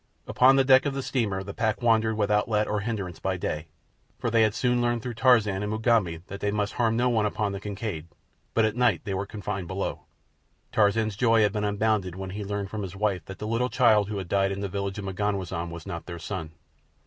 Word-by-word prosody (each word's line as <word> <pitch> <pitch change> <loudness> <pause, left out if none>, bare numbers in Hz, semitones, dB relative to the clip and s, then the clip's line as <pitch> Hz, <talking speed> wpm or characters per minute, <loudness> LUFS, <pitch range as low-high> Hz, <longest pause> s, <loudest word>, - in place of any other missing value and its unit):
Upon 130 +2 +5
the 135 - +5
deck 130 +1 +5
of 140 - -2
the 135 - -3
steamer 105 -8 -1
the 100 +1 -7
pack 110 +1 -1
wandered 110 -2 +3
without 105 0 +1
let 105 -1 +1
or 105 - 0
hindrance 100 -5 -4
by - - -1
day, 75 +2 -3 0.5
for 115 - -2
they 115 0 +4
had 110 -1 +3
soon 125 0 +1
learned 120 -1 0
through 125 - -4
Tarzan 110 -5 +3
and 105 0 -2
Mugambi 110 -7 +1
that 100 +1 -8
they 105 - 0
must 105 0 -1
harm 115 -2 +1
no 125 +1 +2
one 110 -3 +2
upon 105 0 -1
the 100 - -4
Kincaid; 100 -5 -5 0.5
but 115 - +4
at 110 0 -1
night 125 -2 +2
they 100 -3 -3
were 95 +1 -2
confined 100 -3 -5
below. 95 +3 -4 0.7
Tarzan's 110 0 +2
joy 115 0 +4
had 105 -1 +2
been 105 -1 -1
unbounded 105 -3 0
when 95 0 -6
he 105 +2 -5
learned 100 0 -4
from 110 - -4
his 95 -2 -6
wife 100 -4 0
that 95 - -9
the - - -6
little 115 +3 0
child 110 -6 +4
who 105 - -3
had 95 -2 -4
died 95 +1 +1
in 100 0 -4
the 100 - -1
village 100 +1 -3
of 100 - -5
M'ganwazam 95 -3 -2
was 85 -1 -8
not 85 - -6
their 85 -1 -6
son. 85 -1 -5
105 Hz, 235 wpm, -26 LUFS, 95-115 Hz, 0.7 s, Upon